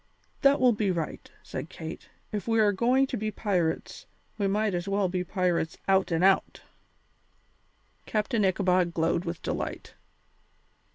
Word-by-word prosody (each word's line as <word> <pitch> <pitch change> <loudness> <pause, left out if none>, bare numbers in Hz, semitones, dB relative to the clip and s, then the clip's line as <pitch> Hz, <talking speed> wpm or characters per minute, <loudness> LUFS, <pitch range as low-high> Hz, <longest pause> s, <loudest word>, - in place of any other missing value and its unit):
"That 275 +1 +5
will 255 -1 +5
be 210 -2 0
right," 170 -4 -3
said - - -6
Kate; - - -8 0.2
"if 210 -1 -4
we're 220 -2 +4
going 245 +7 +3
to 265 - -4
be 215 0 -2
pirates, 185 -6 -2 0.3
we 200 -2 0
might 210 +1 +1
as 175 +1 -2
well 195 -1 +1
be 180 0 -1
pirates 180 -3 -1
out 190 -1 +3
and 165 +1 +1
out." 195 0 +2 1.4
Captain 215 +1 0
Ichabod 185 -2 +2
glowed 165 +2 +1
with 170 -1 -5
delight. - - -4
195 Hz, 145 wpm, -28 LUFS, 180-215 Hz, 1.4 s, That